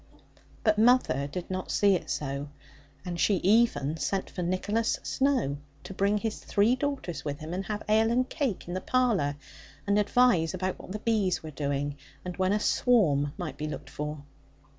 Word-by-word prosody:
But 215 -1 +3
mother 225 - +4
did 175 +5 -6
not 185 0 -3
see 200 -1 +4
it 170 -3 -2
so; 140 0 -3 0.6
and 175 -1 -4
she 205 - +3
even 195 -8 +3
sent 190 +4 -2
for 180 - -5
Nicholas 205 +6 0
Snowe 260 - +1 0.3
to - - -8
bring 200 +2 +2
his 220 0 -3
three 210 +5 +3
daughters 255 - -3
with 145 -1 -3
him, 155 +3 -7
and 190 +2 -2
have 210 -1 -4
ale 220 +1 +4
and 250 +2 +2
cake 265 - -2
in 175 - -4
the 185 - -2
parlour, 220 - +1 0.5
and 205 0 +3
advise 205 -6 +3
about 185 0 -3
what - - -10
the 210 - -3
bees 210 -6 0
were 155 - -7
doing, 145 0 -2 0.3
and 180 -1 -4
when 185 0 +2
a 210 - +2
swarm 155 - +2
might 175 -4 -5
be 150 - -2
looked 150 - -7
for. 150 0 -5
185 Hz, 185 wpm, -28 LUFS, 155-220 Hz, 0.6 s, mother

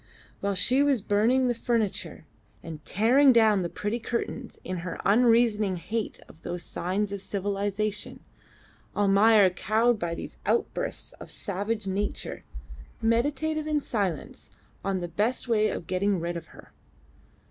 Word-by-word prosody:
While 200 0 -1
she 250 +9 +4
was 285 -3 +3
burning 235 +6 +3
the 245 - +2
furniture, 230 -3 -2 0.4
and 160 -2 -8
tearing 255 - +5
down 220 -4 +4
the 175 - -2
pretty 210 +6 -3
curtains 235 +1 -4
in 185 0 -4
her 175 +1 -5
unreasoning 225 -2 +4
hate 215 +5 -4
of 160 - -17
those 175 0 -5
signs 195 +4 -2
of 200 -1 -4
civilisation, 205 +1 -2 0.7
Almayer, 205 0 +5
cowed 220 +5 +1
by 170 -1 -2
these - - -8
outbursts - - -1
of - - -10
savage 205 +2 -3
nature, 195 +2 -3 0.6
meditated 290 +7 0
in 305 -1 +1
silence 200 - -3 0.3
on 195 -2 -1
the 175 - -3
best 210 +10 0
way 215 -2 +3
of - - -4
getting 190 +2 0
rid 170 +1 -3
of 165 -1 -6
her. - - -16
210 Hz, 140 wpm, -27 LUFS, 190-235 Hz, 0.7 s, tearing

